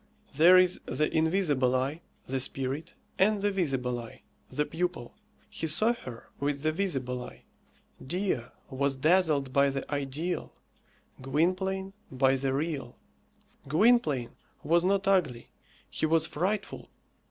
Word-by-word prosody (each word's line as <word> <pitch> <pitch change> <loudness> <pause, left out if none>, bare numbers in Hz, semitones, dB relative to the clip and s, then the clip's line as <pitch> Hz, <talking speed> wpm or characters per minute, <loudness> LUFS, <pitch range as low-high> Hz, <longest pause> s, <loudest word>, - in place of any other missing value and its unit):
There 170 +6 +7
is 185 0 +4
the 155 - -1
invisible 160 -6 +2
eye, 135 +6 -1 0.2
the 135 +1 -2
spirit, 135 +5 -2 0.2
and 205 +2 +3
the 205 +1 +1
visible 135 -10 -1
eye, 115 -1 -11 0.3
the 150 - -1
pupil. 170 -6 -3 0.3
He 160 - -4
saw 215 +10 +2
her 125 - -10
with 140 0 -2
the 155 - +2
visible 135 -9 -2
eye. - - -12 0.6
Dea 180 -3 0 0.3
was 135 +1 0
dazzled 150 -3 +2
by 140 0 +4
the 135 0 -4
ideal; 145 +5 -3 0.7
Gwynplaine, 185 +7 -1 0.2
by 135 0 +3
the 135 0 -1
real. 140 -3 -3 0.7
Gwynplaine 155 - +3 0.3
was 170 +2 +3
not 195 +1 +1
ugly; 160 -12 +1 0.4
he 155 - -1
was 160 0 +3
frightful. 185 +8 -3
155 Hz, 130 wpm, -29 LUFS, 135-180 Hz, 0.7 s, There